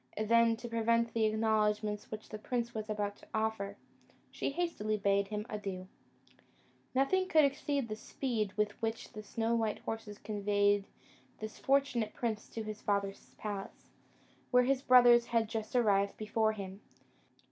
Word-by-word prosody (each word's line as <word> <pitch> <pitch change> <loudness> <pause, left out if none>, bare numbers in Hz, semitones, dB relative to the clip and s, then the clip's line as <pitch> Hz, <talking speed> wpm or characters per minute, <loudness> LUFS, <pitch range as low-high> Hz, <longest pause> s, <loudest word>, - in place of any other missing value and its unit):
Then, 230 +1 +4
to 240 - -7
prevent 230 0 +1
the 225 -1 +2
acknowledgments 215 -1 +1
which 215 0 -7
the 215 - -6
prince 235 +1 -2
was 215 0 -5
about 205 -1 -2
to - - -17
offer, 220 -2 -1 0.5
she - - -2
hastily 275 -10 -1
bade 200 0 +2
him 210 0 -4
adieu. 195 -4 -5 1.1
Nothing 370 +8 +2
could 310 -5 +5
exceed 280 -1 -1
the 215 - -4
speed 220 -2 -2
with 210 -1 +1
which 225 0 -3
the 215 - -6
snow 225 +2 -1
white 225 -2 +1
horses 220 -2 -5
conveyed 205 -1 +1 0.5
this 215 0 -7
fortunate 265 -5 +1
prince 220 -3 -3
to 225 - -5
his 215 -1 -6
father's 200 -1 -2
palace, 205 -2 -6 0.6
where 250 0 +5
his 265 +1 +1
brothers 245 -2 +7
had 230 -2 +1
just 220 +1 -4
arrived 200 -4 +3
before 220 0 +1
him. 195 -1 -7
220 Hz, 150 wpm, -33 LUFS, 210-235 Hz, 1.1 s, brothers